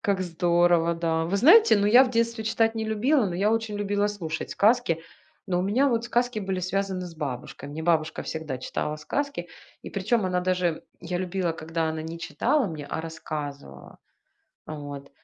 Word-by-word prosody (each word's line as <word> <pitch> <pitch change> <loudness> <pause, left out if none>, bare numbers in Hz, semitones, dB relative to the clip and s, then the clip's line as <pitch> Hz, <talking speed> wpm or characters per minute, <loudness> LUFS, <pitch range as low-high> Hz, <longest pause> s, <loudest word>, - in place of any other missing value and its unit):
Как 195 -2 0
здорово, 175 -1 +2
да. 165 -1 0
Вы 190 +4 0
знаете, 375 - +7
ну 205 0 +2
я 245 +5 +7
в 250 - -3
детстве 230 -1 0
читать 225 +1 +1
не 220 0 -2
любила, 220 +3 +2
но 175 - -3
я 200 +4 +2
очень 225 -2 -1
любила 205 0 0
слушать 165 -6 -4
сказки, 215 -6 +2 0.5
но 180 -2 0
у - - +1
меня 245 +9 +2
вот 235 -2 0
сказки 240 -1 0
были 190 -2 -2
связаны 190 0 -2
с 175 -2 -8
бабушкой. 140 -2 -6
Мне 155 +2 -6
бабушка 160 -2 +1
всегда 155 -5 -5
читала 150 +3 -3
сказки, 265 - -3 0.3
и - - -8
причем 210 +2 0
она 180 -1 0
даже 180 -3 0 0.2
я 175 +1 -3
любила, 180 -2 -1
когда 160 0 -2
она 160 0 -4
не 165 +1 -6
читала 270 - 0
мне, 155 -5 -6
а - - -3
рассказывала 145 - -7 0.7
а 155 - -6
вот. 145 -1 -8
180 Hz, 185 wpm, -26 LUFS, 160-215 Hz, 0.7 s, знаете